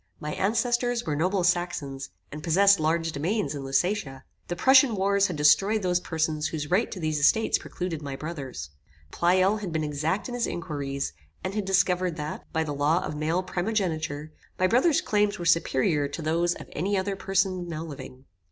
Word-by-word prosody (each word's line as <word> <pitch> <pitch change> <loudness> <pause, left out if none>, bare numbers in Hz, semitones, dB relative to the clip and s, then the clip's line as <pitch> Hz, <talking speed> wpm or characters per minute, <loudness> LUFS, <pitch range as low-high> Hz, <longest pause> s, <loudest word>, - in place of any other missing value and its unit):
My 150 0 -4
ancestors 240 +3 0
were 150 - -1
noble 180 +5 +1
Saxons, 155 -7 -1 0.2
and 150 - -7
possessed 195 +5 +4
large 165 +1 0
domains 155 +2 -1
in 140 -2 -5
Lusatia. 135 -1 -1 0.2
The 175 - -3
Prussian 260 +3 +5
wars 200 +1 +2
had 180 - -4
destroyed 190 +9 +4
those 180 -1 +2
persons 160 -2 -1
whose 155 -2 -5
right 205 +6 +2
to 190 - -7
these 155 -2 -1
estates 220 +10 +3
precluded 175 -4 -5
my 140 -2 -5
brother's. 135 - -6 0.4
Pleyel 185 +4 +3
had 200 -5 -5
been 160 -1 -1
exact 155 +6 -1
in 245 - -6
his 245 -1 -1
inquiries, 140 - -4 0.3
and 185 - -3
had 210 -1 -2
discovered 185 -2 +1
that, 150 -1 -6
by 160 - 0
the 150 -2 -4
law 145 +5 +1
of 155 - -5
male 160 +5 0
primogeniture, 165 -7 -2 0.3
my 185 - +2
brother's 255 - +3
claims 210 0 +1
were 175 - -6
superior 150 -3 +2
to 145 +3 -6
those 170 +2 +1
of - - -10
any 195 +6 -1
other 195 +1 -1
person 190 -2 -1
now 160 -1 -4
living. 135 -4 -10
170 Hz, 180 wpm, -26 LUFS, 150-195 Hz, 0.4 s, Prussian